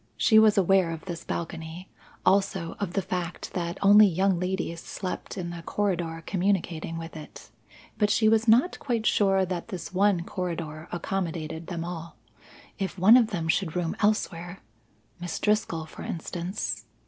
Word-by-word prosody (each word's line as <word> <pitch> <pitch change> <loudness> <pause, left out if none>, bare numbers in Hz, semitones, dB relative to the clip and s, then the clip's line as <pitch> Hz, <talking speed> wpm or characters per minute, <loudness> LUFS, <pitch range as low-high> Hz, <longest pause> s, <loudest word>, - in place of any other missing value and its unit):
She 220 -2 +6
was 215 -1 +5
aware 190 -2 +4
of 165 -1 -6
this 170 -3 -6
balcony, 165 +2 -5 0.4
also 190 -3 +2
of 195 -4 -3
the 195 - 0
fact 180 -1 -4
that 170 0 -3
only 205 +1 +8
young 190 0 +1
ladies 180 -2 -2
slept 185 +1 -6
in 175 -2 -4
the 170 -1 -7
corridor 170 -4 -2
communicating 175 -4 -1
with 165 0 -7
it. 155 -1 -11 0.5
But 210 -1 +3
she 220 +1 +3
was 225 +1 +3
not 245 +11 +4
quite 235 -5 -2
sure 195 -3 +3
that 175 -1 -4
this 185 -5 -7
one 195 -2 +3
corridor 170 -4 -5
accommodated 170 -3 -3
them 170 -2 -4
all. 170 -1 -7 0.6
If 195 -1 -3
one 195 +6 +7
of 245 -3 +5
them 175 -7 -3
should 165 0 0
room 175 -2 -1
elsewhere! 190 -4 -1 0.6
(Miss 175 0 -4
Driscoll, 210 -6 0
for 160 - -11
instance). 175 +4 -4
180 Hz, 160 wpm, -27 LUFS, 165-200 Hz, 0.6 s, only